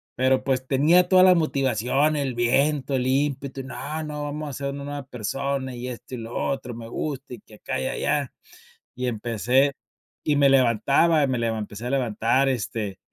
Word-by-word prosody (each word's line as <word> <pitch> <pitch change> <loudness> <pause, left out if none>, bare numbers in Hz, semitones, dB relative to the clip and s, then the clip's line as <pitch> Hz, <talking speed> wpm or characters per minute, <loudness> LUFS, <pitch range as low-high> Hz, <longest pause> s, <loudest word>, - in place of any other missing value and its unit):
Pero, 130 +1 +2
pues, 130 -1 0
tenía 165 +7 +4
toda 185 -1 +7
la 185 -1 +8
motivación, 135 -1 +1
el 135 -4 -2
viento, 135 +4 +1
el 125 -1 0
ímpetu 135 0 -1
y - - -9
no, 150 +4 -5
no, 150 -1 -5
vamos 150 +1 -4
a - - -4
hacer 140 +1 -4
una 140 0 -6
nueva 145 -1 -5
persona 130 +2 -3
y 120 +1 -6
esto 125 +1 -8
y - - -6
lo 115 +1 -7
otro, 135 -3 -2
me 115 -1 -8
gusta 135 +1 -5
y 120 - -8
que 105 - -17
acá 65 -9 -4
y - - -1
allá. - - -1 0.6
Y 125 +1 -2
empecé 120 +4 +1 0.5
y 150 - +1
me 140 -1 +5
levantaba, 135 +5 +4
me 125 -2 -1
levan 115 -1 0
me - - -3
empecé 105 +3 -6
a - - -2
levantar, 130 +1 +1
este, 105 -5 -3
135 Hz, 195 wpm, -24 LUFS, 120-145 Hz, 0.6 s, la